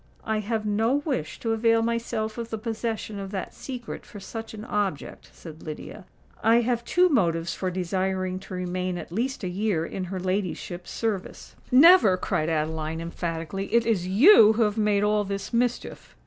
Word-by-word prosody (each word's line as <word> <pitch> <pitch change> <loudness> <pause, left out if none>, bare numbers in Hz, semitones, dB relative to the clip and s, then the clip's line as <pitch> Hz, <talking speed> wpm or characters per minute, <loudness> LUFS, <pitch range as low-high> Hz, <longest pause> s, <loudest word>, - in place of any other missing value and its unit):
"I 220 0 0
have 215 +1 -2
no 220 +5 +1
wish 220 - -3
to 225 - -1
avail 225 0 +3
myself 230 -1 -2
of 230 -1 -5
the 220 - -3
possession 220 -1 -4
of 195 -1 -6
that 190 -2 -5
secret 250 -3 -7
for 205 - -11
such 225 +3 -7
an 215 +1 -8
object," 200 -10 -3
said 160 -2 -12
Lydia. 155 -1 -8 0.4
"I 230 +2 +5
have 240 0 -1
two 360 +8 +3
motives 170 - +1
for 185 - -2
desiring 185 +1 -2
to 190 - -8
remain 180 0 -2
at 175 - -8
least 250 +6 -2
a - - -1
year 185 -2 -1
in 185 +2 -5
her 185 +1 -5
ladyship's 185 -1 -3
service." 215 -5 -4 0.2
"Never!" 265 - +7
cried 155 -3 -1
Adeline, 160 0 -2
emphatically. 170 +2 -4
"It 235 0 +3
is 200 -6 0
you 220 - +7
who 225 +1 +2
have 210 -1 0
made 210 -2 +2
all 210 0 +2
this 200 +2 -5
mischief!" 245 +1 -2
205 Hz, 175 wpm, -26 LUFS, 180-225 Hz, 0.4 s, Never